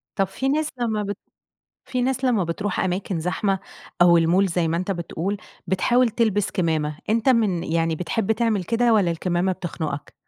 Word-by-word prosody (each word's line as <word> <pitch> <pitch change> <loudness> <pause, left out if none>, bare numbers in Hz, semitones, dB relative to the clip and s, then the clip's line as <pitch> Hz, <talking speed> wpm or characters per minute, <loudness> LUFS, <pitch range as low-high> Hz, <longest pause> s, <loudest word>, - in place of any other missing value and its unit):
طب 195 -1 +1
في 265 +8 -2
ناس 305 +2 +1
لما 220 -3 0
بت 205 0 -4 0.7
فيه 250 -1 -2
ناس 265 +1 0
لما 235 -7 +2
بتروح 180 +4 -2
أماكن 185 -1 -1
زحمة 190 +3 0 0.4
أو 170 -1 +6
الmall 175 +4 +3
زي 175 -3 0
ما 165 - 0
أنت 185 +3 -2
بتقول 175 +2 -3 0.3
بتحاول 240 +7 +3
تلبس 210 -3 +1
كمامة، 155 -5 -1
أنت 225 +4 +2
من 215 -9 +2
يعني 165 0 0
بتحب 195 +6 0
تعمل 220 -4 0
كده 235 +3 +2
والّا 195 -5 +3
الكمامة 175 +2 0
بتخنقك؟ 170 -5 -5
190 Hz, 170 wpm, -23 LUFS, 170-225 Hz, 0.7 s, أو